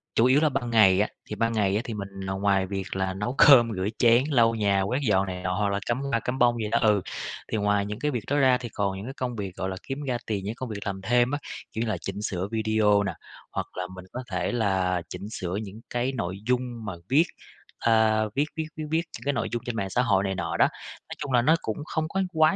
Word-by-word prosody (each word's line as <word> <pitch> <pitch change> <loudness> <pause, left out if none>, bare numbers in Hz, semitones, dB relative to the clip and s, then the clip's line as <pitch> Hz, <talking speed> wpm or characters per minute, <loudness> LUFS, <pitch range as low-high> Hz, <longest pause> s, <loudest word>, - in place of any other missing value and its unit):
chủ 115 - +5
yếu 130 +3 +5
là 155 - +4
ban 135 -3 -2
ngày 100 -5 +6
á, 105 - +2 0.2
thì 105 - -6
ban 115 +1 0
ngày 100 -3 +2
á, 110 - +1
thì 115 - -4
mình 100 -2 -5
là 95 0 -5
ngoài 95 -1 +2
việc 95 -1 -4
là 95 0 -1
nấu 105 +7 -3
cơm, 120 -5 +8
rửa 95 +1 -1
chén, 120 +1 +5
lau 115 -5 +4
nhà 100 -3 +2
quét 120 +8 0
dọn 95 -1 +3
này 90 0 -5
nọ 95 +3 0
rồi 100 0 0
cắm 120 +3 -1
hoa, 140 -4 0
cắm 125 +3 -3
bông 120 -1 +4
vậy 110 -2 -2
đó, 115 - +3
ừ. 105 -3 +4 0.5
Thì 110 - +1
ngoài 105 -1 +2
những 105 +2 -5
cái 150 0 0
việc 120 -5 -3
đó 145 - +1
ra 130 -3 +5
thì 120 -2 -7
còn 100 -3 -2
những 100 - -7
cái 130 - -6
công 125 -3 -3
việc, 100 -4 -5
gọi 95 - -3
là, 95 - -4
kiếm 135 +2 -5
ra 130 -3 -1
tiền, 100 -3 -2
những 105 +3 -3
công 130 0 -5
việc 105 -2 -4
làm 95 -1 -3
thêm 120 +3 +3
á, 145 - -1 0.3
kiểu 110 - -3
như 120 - 0
là 105 - 0
chỉnh 95 +4 -5
sửa 95 -3 -2
video 110 -2 +3
nè, 100 -3 -2 0.4
hoặc - - -3
là 90 - -2
mình 90 0 -10
có 125 - -4
thể 90 0 -1
là 95 -6 +1
chỉnh 100 - -7
sửa 90 -4 -4
những 105 +2 -9
cái 120 +2 0
nội 95 -5 -3
dung 125 -2 -1
mà 105 - -3 0.2
viết, 150 +6 +5 0.5
a, 110 -1 +3
viết 145 +2 +2
viết 160 -1 -2
viết 155 - -3
viết 160 +1 +3 0.2
những - - -13
cái 140 - +1
nội - - -1
dung 120 -1 -3
trên 120 - -3
mạng 100 -3 -2
xã 125 - +1
hội 100 -6 +2
này 95 -1 -1
nọ 85 -2 -2
đó. - - +6 0.4
Nói - - -6
chung 145 -3 -5
là 120 -1 +4
nó 155 +6 +5
cũng 110 +6 -4
không 155 0 -2
có 190 +4 -1
quá 160 +3 +4
110 Hz, 275 wpm, -26 LUFS, 95-125 Hz, 0.5 s, cơm